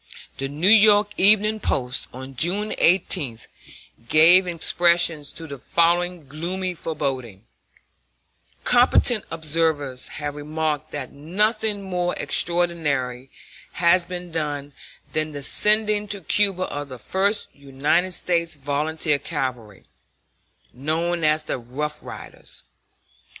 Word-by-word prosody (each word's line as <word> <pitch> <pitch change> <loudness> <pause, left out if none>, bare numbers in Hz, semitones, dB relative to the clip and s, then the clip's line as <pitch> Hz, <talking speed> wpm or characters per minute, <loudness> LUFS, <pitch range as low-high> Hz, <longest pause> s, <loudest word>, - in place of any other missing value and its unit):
The 135 - -2
New 150 +5 -3
York 210 -1 +6
Evening 215 +2 +4
Post, 125 -9 -2
on 130 +2 -10
June 195 - -1
18, 165 - +3 0.7
gave 175 +4 +7
expression 170 -2 +2
to 155 +3 -6
the 140 -3 -8
following 170 +1 0
gloomy 180 +6 -4
foreboding: 135 - -4 1.2
"Competent 245 -2 +3
observers 155 -5 -1
have 145 0 -4
remarked 150 0 -3
that 140 -3 -6
nothing 205 +7 -1
more 180 -2 -2
extraordinary 150 -8 -1 0.4
has 175 +1 +4
been 180 -1 -7
done 145 -3 -4 0.4
than 155 0 -2
the 145 -1 -6
sending 210 +4 +2
to 200 -1 -2
Cuba 195 +1 +1
of 145 -4 -5
the 130 - -8
First 195 - 0
United 145 +6 0
States 170 -2 0
Volunteer 145 +2 -1
Cavalry, 120 -9 -5 0.9
known 160 +6 -1
as 155 0 +2
the 145 - -4
'rough 150 +6 -5
riders.' - - -10
160 Hz, 110 wpm, -22 LUFS, 145-180 Hz, 1.2 s, gave